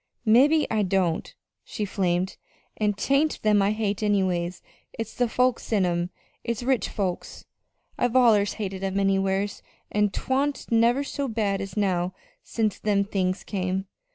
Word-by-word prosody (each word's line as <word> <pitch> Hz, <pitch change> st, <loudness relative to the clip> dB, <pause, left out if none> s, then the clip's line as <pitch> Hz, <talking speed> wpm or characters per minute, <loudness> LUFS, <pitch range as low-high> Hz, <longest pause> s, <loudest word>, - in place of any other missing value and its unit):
"Mebbe 280 Hz, +8 st, +5 dB
I 220 Hz, -1 st, +2 dB
don't," 185 Hz, -4 st, 0 dB, 0.3 s
she 210 Hz, -, -4 dB
flamed, 185 Hz, -1 st, -1 dB, 0.4 s
"an' 210 Hz, -1 st, +1 dB
'tain't 275 Hz, +9 st, +1 dB
them 210 Hz, -1 st, +4 dB
I 195 Hz, -, +3 dB
hate, 210 Hz, -2 st, -1 dB
anyway 190 Hz, -4 st, +1 dB, 0.4 s
it's 225 Hz, -1 st, -5 dB
the 245 Hz, -1 st, 0 dB
folks 250 Hz, 0 st, 0 dB
in 200 Hz, -4 st, +3 dB
'em. 175 Hz, 0 st, -1 dB, 0.3 s
It's 235 Hz, 0 st, -3 dB
rich 250 Hz, -5 st, +1 dB
folks. 190 Hz, -4 st, -4 dB, 0.5 s
I've 245 Hz, 0 st, +1 dB
allers 220 Hz, -5 st, +5 dB
hated 195 Hz, -3 st, -5 dB
'em 195 Hz, 0 st, -1 dB
anywheres, 195 Hz, 0 st, 0 dB, 0.3 s
but 210 Hz, -1 st, +2 dB
'twa'n't 270 Hz, +3 st, -1 dB
never 235 Hz, +4 st, +3 dB
so 280 Hz, 0 st, -3 dB
bad 210 Hz, -4 st, -1 dB
as 195 Hz, 0 st, -7 dB
now 185 Hz, -3 st, 0 dB, 0.3 s
since 215 Hz, -4 st, -1 dB
them 205 Hz, -1 st, +2 dB
things 185 Hz, -2 st, -1 dB
came. 190 Hz, -1 st, -2 dB
205 Hz, 150 wpm, -25 LUFS, 190-230 Hz, 0.5 s, Mebbe